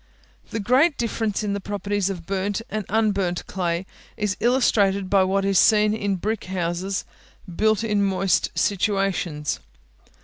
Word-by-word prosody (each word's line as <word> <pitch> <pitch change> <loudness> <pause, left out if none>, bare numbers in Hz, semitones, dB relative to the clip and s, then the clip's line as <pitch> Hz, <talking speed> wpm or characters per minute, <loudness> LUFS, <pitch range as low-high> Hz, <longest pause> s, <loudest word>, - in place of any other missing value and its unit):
The 225 - -3
great 260 - +3
difference 225 -2 -1
in 205 -1 -1
the 200 - -2
properties 205 0 -2
of 175 -4 -6
burnt 195 +3 -2
and 215 -2 -3
unburnt 200 -5 0
clay 175 -1 -2 0.3
is 210 -3 -1
illustrated 200 -6 +2
by 195 -1 +5
what 195 +1 +1
is 195 -2 +3
seen 210 -1 +4
in 205 -2 -1
brick 210 +3 -3
houses, 185 +1 -2 0.5
built 215 +1 +2
in 210 -2 +1
moist 195 -1 +1
situations. 195 -7 0
200 Hz, 140 wpm, -23 LUFS, 190-215 Hz, 0.5 s, by